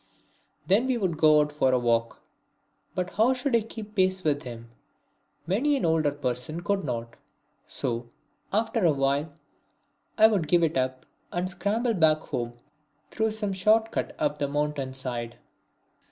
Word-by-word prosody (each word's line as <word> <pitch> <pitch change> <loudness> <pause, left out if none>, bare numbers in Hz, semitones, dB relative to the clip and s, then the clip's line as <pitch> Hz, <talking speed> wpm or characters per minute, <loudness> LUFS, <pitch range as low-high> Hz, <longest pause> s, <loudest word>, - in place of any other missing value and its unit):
Then 210 +7 +3
we 255 -2 +1
would 185 -7 -1
go 155 -1 +6
out 150 0 -1
for 140 -3 +2
a 130 - +3
walk. 115 -1 0 0.7
But 180 -1 -2
how 235 +5 +3
should 255 0 0
I 230 - +4
keep 215 -1 -9
pace 185 -2 +1
with 145 -2 +1
him? 115 -2 -9 0.7
Many 255 - +2
an 265 - -1
older 160 -2 +3
person 140 +3 -3
could 200 -1 0
not! 120 -3 -4 0.5
So, 120 -1 -2 0.4
after 225 +1 0
a 165 -3 +5
while, 140 +3 0 0.9
I 220 - +7
would 205 -8 +3
give 170 +2 +3
it 160 -1 +1
up 130 0 -1 0.3
and 175 +1 -1
scramble 220 +5 0
back 160 -5 +3
home 120 -1 -4 0.6
through 220 0 0
some 215 -2 -3
short 215 +4 +3
cut - - -3
up 150 0 -1
the 145 - 0
mountain 145 -2 -2
side. 120 -3 -4
160 Hz, 160 wpm, -27 LUFS, 135-210 Hz, 0.9 s, I